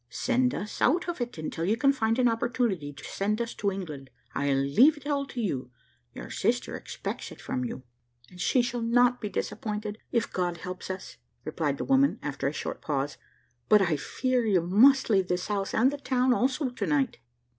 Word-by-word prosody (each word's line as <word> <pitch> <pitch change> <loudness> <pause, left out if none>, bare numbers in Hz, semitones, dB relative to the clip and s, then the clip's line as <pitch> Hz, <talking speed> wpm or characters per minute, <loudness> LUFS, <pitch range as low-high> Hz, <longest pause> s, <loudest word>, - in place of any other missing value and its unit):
"Send 255 0 +1
us 210 - -6
out 340 +9 +3
of 340 -6 -3
it, 240 -6 -4
until 160 +1 -4
you 210 +6 +1
can 275 +2 +4
find 225 -3 +1
an 250 -1 +4
opportunity 230 - 0
to 140 -1 -13
send 210 +3 -1
us 235 0 -2
to 200 -1 -1
England. 155 -9 -6 0.2
I 140 0 0
leave 140 - +4
it 290 - -14
all 280 -1 -1
to 255 - -7
you 135 - -2 0.5
your - - -8
sister - - 0
expects - - -6
it - - -12
from 125 - -3
you." 125 +1 -5 0.4
"And 180 0 -11
she 250 +5 +3
shall 240 0 -2
not 245 +2 +3
be 210 - -3
disappointed, 210 +1 -4
if 230 -1 0
God 175 -2 -1
helps 180 +2 -7
us," 190 0 -6 0.3
replied 155 -3 -1
the - - -3
woman, 270 +1 +3
after 140 -2 -2
a - - 0
short - - -5
pause; 140 -1 -2 0.5
"but 210 - +7
I 170 -4 +1
fear 255 - 0
you 200 -6 +3
must 235 +11 +5
leave 190 -3 +3
this 180 +2 -2
house 200 -2 -1
and 255 +5 +3
the 290 - -5
town 255 -2 +2
also 260 +2 0
to 245 - -3
night." 275 -5 +1
215 Hz, 200 wpm, -28 LUFS, 175-255 Hz, 0.5 s, but